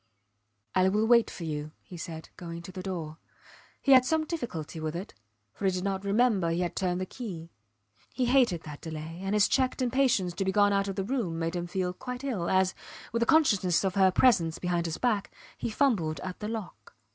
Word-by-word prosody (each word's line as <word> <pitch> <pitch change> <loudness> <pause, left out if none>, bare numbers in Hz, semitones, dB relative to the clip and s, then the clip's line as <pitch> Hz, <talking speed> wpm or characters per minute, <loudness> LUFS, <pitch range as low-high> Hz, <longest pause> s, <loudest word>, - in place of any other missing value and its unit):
I 185 0 +4
will 210 +3 +2
wait 235 0 +5
for 175 - -8
you, 150 -1 -4
he 180 - -11
said, 160 -1 -7
going 170 -1 -7
to 185 - -9
the 185 - -6
door. 170 -5 -5 0.6
He 275 - +3
had 260 -1 +8
some 315 +4 +1
difficulty 205 - -5
with 155 0 -3
it, 190 +5 -6 0.4
for 200 - -5
he 190 - +4
did 180 0 -3
not 195 -1 -2
remember 200 -3 +2
he 165 +2 0
had 175 - -2
turned 180 -1 0
the 185 - -2
key. 175 -7 -7 0.6
He 255 - 0
hated 240 -9 +3
that 150 -2 -9
delay, 160 +1 -7
and 195 +2 -1
his 210 -1 +5
checked 260 0 +1
impatience 250 -8 +2
to 195 - -2
be 190 - +1
gone 205 0 +4
out 195 0 +1
of 195 - -3
the 195 - -1
room 205 -7 -2
made 165 +1 -2
him 175 0 -3
feel 180 0 -2
quite 250 +6 -7
ill 215 -11 -2
as, 190 0 +3 0.4
with 230 - 0
the 235 - +1
consciousness 205 - +4
of 190 -1 0
her 190 -1 +5
presence 180 -6 +3
behind 175 -1 -1
his 160 - -3
back, 220 -5 0 0.2
he - - -3
fumbled 205 - +1
at 185 +2 -6
the 210 - -4
lock. 220 -4 -7
190 Hz, 215 wpm, -29 LUFS, 170-230 Hz, 0.6 s, had